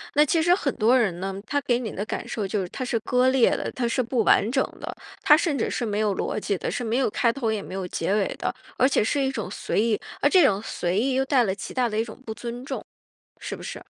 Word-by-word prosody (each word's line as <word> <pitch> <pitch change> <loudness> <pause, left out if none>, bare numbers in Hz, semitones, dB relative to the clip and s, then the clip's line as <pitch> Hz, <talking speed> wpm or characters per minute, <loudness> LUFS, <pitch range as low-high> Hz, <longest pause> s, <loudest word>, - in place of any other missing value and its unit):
那 295 - +7
其 320 +2 +2
实 350 +2 +5
很 280 -8 -1
多 235 +4 +4
人 195 -8 +1
呢， 195 +1 -3
他 285 +4 +1
给 245 -2 +1
你 225 -4 -4
的 205 - -4
感 - - -4
受 210 -4 -3
就 195 +1 -1
是 180 - -5
他 255 - -5
是 240 - 0
割 250 +2 +2
裂 260 -2 +4
的， - - -2
他 250 - -2
是 255 +2 +1
不 235 -1 0
完 210 - +4
整 265 0 +2 0.2
的。 - - -6 0.3
他 300 - +7
甚 320 -4 0
至 225 - 0
是 245 - -2
没 210 -1 -1
有 210 -3 +1
逻 - - -2
辑 200 -2 -1
的， - - -3
是 - - -3
没 225 +1 -1
有 260 -4 +2
开 245 +1 +1
头 230 -5 -1
也 210 -2 -2
没 185 - -9
有 190 -1 -3
结 165 +4 -1
尾 205 - +2
的。 - - -1 0.2
而 260 - +5
且 270 - +2
是 280 +5 0
一 265 - +1
种 215 -8 -4
随 210 - -1
意， 225 -2 +1 0.2
而 - - +4
这 365 -7 +6
种 200 -3 +2
随 180 -4 -2
意 260 +2 +1
又 265 - +2
带 265 -3 +3
来 190 -3 0
极 - - -7
大 250 -2 +1
的 215 +1 -1
一 225 - +1
种 220 - -10
不 220 - -4
尊 240 +2 -6
重， - - -4 0.6
是 - - -5
不 - - -11
是？ - - -6
235 Hz, 310 characters per minute, -25 LUFS, 210-265 Hz, 0.6 s, 那